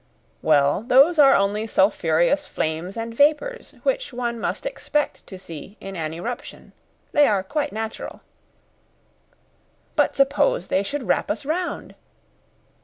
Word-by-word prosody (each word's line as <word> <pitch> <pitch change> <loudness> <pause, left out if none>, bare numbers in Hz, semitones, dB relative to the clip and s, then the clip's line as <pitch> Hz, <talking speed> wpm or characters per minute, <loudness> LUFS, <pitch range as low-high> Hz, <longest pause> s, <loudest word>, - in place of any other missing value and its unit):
"Well, 145 +2 +3
those 275 +8 +5
are 275 -2 +7
only 205 +3 +1
sulphureous 190 - +2
flames 160 +6 -3
and 230 0 -4
vapours, 305 - +1
which - - -1
one 240 -1 -3
must 225 - -3
expect 300 -11 -2
to 190 - -9
see 185 +2 -10
in 195 0 -8
an 155 -3 -3
eruption. 225 +10 -7 0.4
They 295 0 +5
are 200 -3 +1
quite 290 +8 -2
natural." 220 0 -6 1.7
"But - - +2
suppose 285 - +2
they 190 - +2
should 270 +7 -4
wrap - - 0
us 300 -2 -3
round." 345 +4 -3
230 Hz, 130 wpm, -23 LUFS, 190-295 Hz, 1.7 s, are